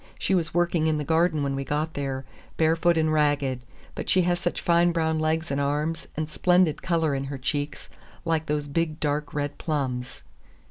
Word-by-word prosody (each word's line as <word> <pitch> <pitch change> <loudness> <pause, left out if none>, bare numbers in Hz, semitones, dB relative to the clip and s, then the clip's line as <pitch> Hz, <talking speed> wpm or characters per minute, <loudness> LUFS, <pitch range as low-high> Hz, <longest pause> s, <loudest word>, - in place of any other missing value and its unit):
She - - 0
was 170 -3 +1
working 170 -2 +1
in 155 -1 +2
the 150 - -2
garden 160 0 +2
when 140 -1 -1
we 135 - -2
got 150 +4 -2
there, 135 -2 -3 0.3
barefoot 165 +1 +3
and 155 -1 +2
ragged. 145 -4 +1 0.3
But - - -5
she 185 - +4
has 175 0 +1
such 175 - -2
fine 170 0 +3
brown 160 -2 0
legs 160 +1 0
and 140 +1 0
arms, 150 +3 -1
and 155 0 -1
splendid 180 0 +2
color 165 -4 +1
in 135 0 -2
her 135 0 -5
cheeks—like 150 +3 -4
those 150 0 -1
big 155 +1 -1
dark 150 -1 -1
red 145 0 -2
plums." 130 -5 -3
155 Hz, 185 wpm, -26 LUFS, 145-165 Hz, 0.3 s, she